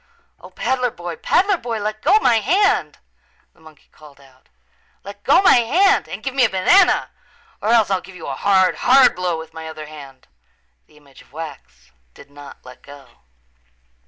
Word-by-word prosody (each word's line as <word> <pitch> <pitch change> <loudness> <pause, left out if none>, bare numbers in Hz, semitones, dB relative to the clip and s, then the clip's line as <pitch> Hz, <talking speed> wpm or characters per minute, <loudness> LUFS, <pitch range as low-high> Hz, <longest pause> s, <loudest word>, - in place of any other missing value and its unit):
"O, - - -14
peddler 250 -1 -2
boy, 175 -5 -8
peddler 390 - +1
boy, 235 -6 -5
let 215 +1 -5
go 380 +8 +3
my 230 - +3
hand," 390 - 0 0.6
the - - -29
monkey 155 -2 -20
called 150 -2 -18
out. 130 -2 -24 0.5
"Let 200 +1 -12
go 290 +8 +3
my 370 - +6
hand 360 - +1
and - - -8
give 265 - -4
me 265 -1 +2
a 235 - +3
banana 345 - +2 0.5
or 215 - -2
else 225 -4 +3
I'll 190 -1 0
give 190 - -15
you 165 - -10
a 140 - -5
hard, 190 +2 +1
hard 260 +1 +4
blow 180 -2 -3
with 160 0 -11
my 160 0 -9
other 155 -1 -9
hand." 140 -4 -14 0.6
The 150 - -24
image 140 -2 -20
of - - -24
wax 130 - -11 0.2
did 140 - -17
not 145 -2 -14
let 125 0 -14
go. 140 -1 -17
185 Hz, 185 wpm, -19 LUFS, 150-245 Hz, 0.6 s, my